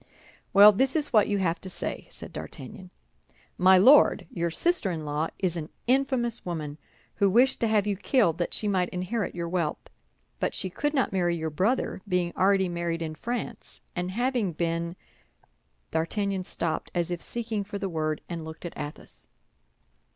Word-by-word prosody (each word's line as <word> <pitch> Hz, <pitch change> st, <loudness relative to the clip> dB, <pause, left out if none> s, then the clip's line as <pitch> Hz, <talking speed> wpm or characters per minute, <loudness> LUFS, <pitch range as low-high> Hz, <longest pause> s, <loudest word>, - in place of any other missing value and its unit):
"Well, 205 Hz, +2 st, +9 dB
this 265 Hz, +7 st, +1 dB
is 300 Hz, -4 st, 0 dB
what 215 Hz, -3 st, +5 dB
you 205 Hz, -, +1 dB
have 175 Hz, -3 st, 0 dB
to 190 Hz, -, -6 dB
say," -, -, -4 dB
said -, -, -9 dB
D'Artagnan: -, -, -8 dB, 0.7 s
"_My 185 Hz, +1 st, +7 dB
Lord, 265 Hz, +10 st, +6 dB
your 170 Hz, -6 st, -1 dB
sister 340 Hz, -, +1 dB
in 160 Hz, -3 st, -4 dB
law 150 Hz, +2 st, -1 dB
is 185 Hz, -3 st, -1 dB
an 160 Hz, -2 st, -5 dB, 0.2 s
infamous 250 Hz, -2 st, +1 dB
woman, 155 Hz, -4 st, -5 dB, 0.4 s
who 200 Hz, -, +4 dB
wished 245 Hz, +7 st, +4 dB
to 230 Hz, -, +1 dB
have 215 Hz, -2 st, +2 dB
you 205 Hz, -1 st, 0 dB
killed 190 Hz, -, +2 dB
that 175 Hz, -, -1 dB
she 210 Hz, -, -2 dB
might 185 Hz, -3 st, +1 dB
inherit 185 Hz, +4 st, -3 dB
your 170 Hz, -1 st, -3 dB
wealth; 170 Hz, -3 st, -2 dB, 0.5 s
but -, -, -1 dB
she 185 Hz, -, -3 dB
could 295 Hz, -, -1 dB
not 265 Hz, -7 st, +1 dB
marry 175 Hz, -2 st, +1 dB
your 160 Hz, -1 st, -3 dB
brother, 190 Hz, -, 0 dB
being 180 Hz, -2 st, 0 dB
already 190 Hz, 0 st, +3 dB
married 170 Hz, -1 st, -2 dB
in 155 Hz, -1 st, -4 dB
France, 235 Hz, +4 st, -5 dB, 0.2 s
and 180 Hz, 0 st, -2 dB
having 235 Hz, -4 st, 0 dB
been_—" 170 Hz, +1 st, -1 dB, 1.0 s
D'Artagnan 190 Hz, +4 st, -1 dB
stopped, 165 Hz, -3 st, -2 dB
as 175 Hz, 0 st, 0 dB
if 175 Hz, -1 st, -3 dB
seeking 225 Hz, -3 st, -3 dB
for 200 Hz, +1 st, -6 dB
the 195 Hz, -, -3 dB
word, 155 Hz, -3 st, -2 dB
and 170 Hz, -2 st, -5 dB
looked 160 Hz, +2 st, -9 dB
at 170 Hz, -, -5 dB
Athos. 145 Hz, -, -8 dB
185 Hz, 175 wpm, -27 LUFS, 170-215 Hz, 1.0 s, Well